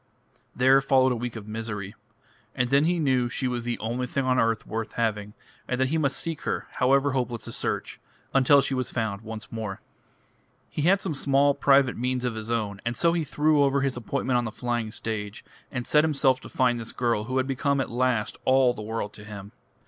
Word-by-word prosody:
There 130 +2 +5
followed 130 -1 +3
a - - +1
week 120 0 -4
of 110 -2 -8
misery. 105 -2 -5 0.6
And 125 0 0
then 140 +2 +4
he 175 +1 +2
knew 130 -6 +1
she 130 +3 -2
was 120 -1 -3
the 120 0 -1
only 120 +3 -3
thing 135 +2 -1
on 130 -1 +2
earth 115 -1 +1
worth 110 0 -4
having, 105 -3 -2 0.3
and 125 - -2
that 130 0 +2
he 160 +2 +1
must 140 -3 0
seek 165 -2 -3
her, - - -3
however 135 +2 +2
hopeless 125 -3 -2
the - - -6
search, - - -3 0.3
until 140 +1 +6
she 135 - -1
was 130 -1 -1
found 110 -4 -2
once 110 -1 -8
more. 110 -4 -5 0.9
He - - -3
had 190 +6 +4
some 185 - -2
small 140 0 +3
private 135 -2 +3
means 125 +1 -1
of 125 - -1
his 110 0 -6
own, 105 -4 -2
and 120 0 -2
so 170 +4 +3
he 170 -2 0
threw 150 0 +2
over 140 0 +3
his 135 -1 0
appointment 125 +1 -1
on 120 - 0
the 110 - -4
flying 120 -2 -2
stage, 105 -1 -5 0.3
and 125 -2 -3
set 150 0 +4
himself 140 -4 +2
to - - -11
find 125 -2 +1
this 115 - -6
girl 115 -3 0
who 130 +2 -2
had 130 - +2
become 140 +1 0
at 135 - -2
last 120 -3 0
all 130 -1 +4
the 110 - -8
world 105 -1 -4
to 105 - -11
him. 100 -1 -9
125 Hz, 215 wpm, -26 LUFS, 115-135 Hz, 0.9 s, until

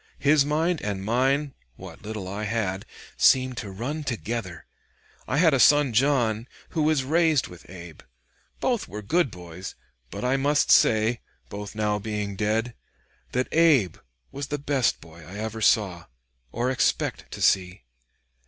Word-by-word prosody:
His 145 0 +4
mind 160 +4 0
and 100 -2 -4
mine 135 +5 +1 0.2
what - - -11
little 105 -3 -6
I 100 +3 -4
had 100 -3 -2 0.3
seemed 130 -1 +4
to 110 - -5
run 130 +11 -4
together.... 115 - -4 0.6
I 135 - -1
had 160 -1 +5
a 135 - +2
son 145 -2 +5
John, 120 -3 +1 0.2
who 160 - -2
was 155 -3 +2
raised 155 0 +2
with 90 0 -14
Abe. 85 -3 -11 0.6
Both 245 -4 -1
were 105 +1 -7
good 165 - +1
boys, 90 -1 -9 0.3
but - - -5
I 130 +2 +2
must 145 +2 +2
say, 110 +1 +4 0.3
both 105 0 -7
now 105 -1 0
being 105 -1 -4
dead, 110 +4 -1 0.6
that 125 +1 0
Abe 150 - +3 0.3
was 140 0 -5
the 145 - -2
best 140 -3 0
boy 80 0 -14
I 90 +6 -10
ever 110 +1 -5
saw 90 -7 +2 0.5
or 120 +3 -1
expect 130 - -1
to - - -7
see." 90 +1 +1
115 Hz, 155 wpm, -25 LUFS, 100-140 Hz, 0.6 s, had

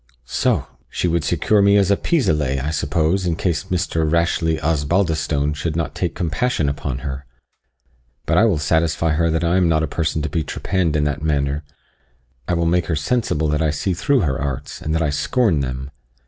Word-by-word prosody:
"Soh! - - 0 0.2
she - - -1
would 85 -2 0
secure 105 +7 +2
me 100 +1 +5
as 100 -1 +3
a - - +5
pis 160 - 0
aller, 75 -3 +1
I 75 - -1
suppose, 80 +5 0
in 85 - 0
case 85 -2 -1
Mr. 85 -3 -1
Rashleigh 85 -1 +1
Osbaldistone 80 -2 0
should 75 +1 -3
not 80 -2 -2
take - - -2
compassion 85 - 0
upon 70 0 -3
her! 65 0 -5 1.0
But - - +3
I 110 - +5
will 100 -8 +2
satisfy 80 +2 +1
her 85 +2 +1
that 80 +1 0
I 85 +2 +2
am 90 -2 +3
not 80 -1 +2
a - - 0
person 80 +1 -1
to - - -1
be 80 +2 -1
trepanned 85 0 -1
in 75 - +2
that 75 -1 -1
manner 70 -1 0 0.8
I 90 - +1
will 85 0 0
make 85 -1 +1
her 80 - 0
sensible 80 -3 0
that 75 +1 0
I 80 - +2
see 75 +5 -1
through 135 - +1
her 75 -4 -1
arts, 70 -3 -4
and 80 +1 -2
that 80 - +1
I 75 - 0
scorn 95 - +1
them." 65 0 -4
80 Hz, 205 wpm, -20 LUFS, 75-85 Hz, 1.0 s, me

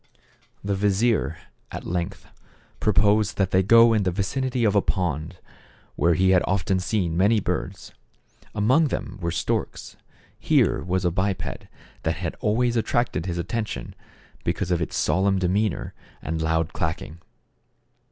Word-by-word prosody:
The 100 0 -1
vizier 100 -4 +1 0.3
at - - -7
length 85 0 -3 0.5
proposed 105 0 +2
that 95 -2 +1
they 95 - +4
go 115 +4 +6
in 110 - +2
the 95 - +1
vicinity 125 +7 -1
of 105 -3 +3
a 100 - +4
pond, 85 -2 -2 0.6
where 85 -1 +2
he 95 +3 +3
had 90 -1 +5
often 95 0 +1
seen 90 -2 -1
many 100 +5 +3
birds. - - -4 0.6
Among 130 +10 +3
them 130 - -5
were 85 - -1
storks; 85 - -3 0.4
here - - +2
was 90 0 -1
a 90 - +2
biped 95 -1 -3 0.4
thait - - +1
had - - -4
always 120 +3 +1
attracted 115 -6 0
his 85 -1 -3
atten 110 +6 -2
tion, 65 - -7 0.5
because 90 - -2
of 85 -1 +1
its 85 - -3
solemn 95 +1 +2
demeanor 95 +2 0 0.3
and 80 0 -3
loud 80 0 0
clacking. 80 +1 -4
95 Hz, 145 wpm, -24 LUFS, 85-105 Hz, 0.6 s, go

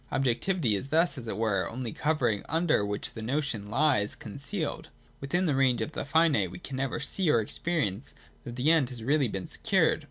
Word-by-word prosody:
Objectivity 135 - +1
is 100 +7 -2
thus, 165 +5 +2
as 120 -5 -7
it 105 - -3
were, 110 -3 0
only 120 -1 -5
a - - -9
covering 125 -9 0
under 160 -8 +2
which 105 0 -3
the 110 - -7
notion 125 -4 -2
lies 120 -4 +2
con - - -9
cealed. 145 +4 -4 0.3
Within 175 +7 0
the 155 - +2
range 130 -3 +3
of 110 +7 -2
the 155 - -4
finite 145 - +3
we 90 - -9
can 130 +9 -6
never 135 0 -2
see 175 +4 +1
or 120 - +4
experience 115 - -2 0.3
that 120 - -7
the 130 +6 +3
End 155 -7 +3
has 125 - -6
been 110 - -8
really 135 -10 +1
secured. - - +1
135 Hz, 210 wpm, -28 LUFS, 110-155 Hz, 0.3 s, or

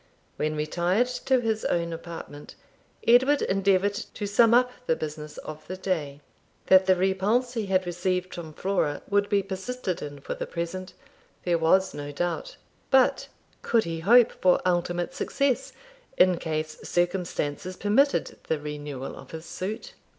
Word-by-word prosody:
When 155 0 -1
retired 175 +8 +1 0.2
to 260 -2 +3
his 220 -2 -1
own 170 -1 0
apartment, 165 -3 -9 0.5
Edward 260 +5 +5
endeavoured 195 +1 +2
to 205 +1 -6
sum 220 +3 +4
up 250 +1 +4 0.2
the 160 - +3
business 150 -1 -6
of 155 0 -9
the 185 - -5
day. 155 -7 -2 0.4
That 190 0 +6
the 185 - +6
repulse 195 +7 +1
he 225 -4 -2
had 185 -1 +2
received 180 +1 -2
from 165 -2 -7
Flora 180 -5 -1
would 205 0 +1
be 200 -1 +2
persisted 190 +1 -4
in 145 -1 -7
for - - -5
the - - -5
present, 180 +2 -5 0.5
there 175 -2 +1
was 190 +4 +3
no 145 0 -6
doubt. 175 - -3 0.3
But 265 -1 +3 0.3
could 230 -2 +2
he 165 -1 -4
hope 235 +7 +6
for 180 -1 +3
ultimate 175 -1 0
success 275 -3 0 0.5
in 180 -2 +5
case 155 -1 -3
circumstances 175 -1 -2
permitted 250 +8 +2
the 160 - +1
renewal 145 -2 -6
of - - -12
his 160 0 -8
suit? 215 - -5
185 Hz, 150 wpm, -26 LUFS, 160-205 Hz, 0.5 s, That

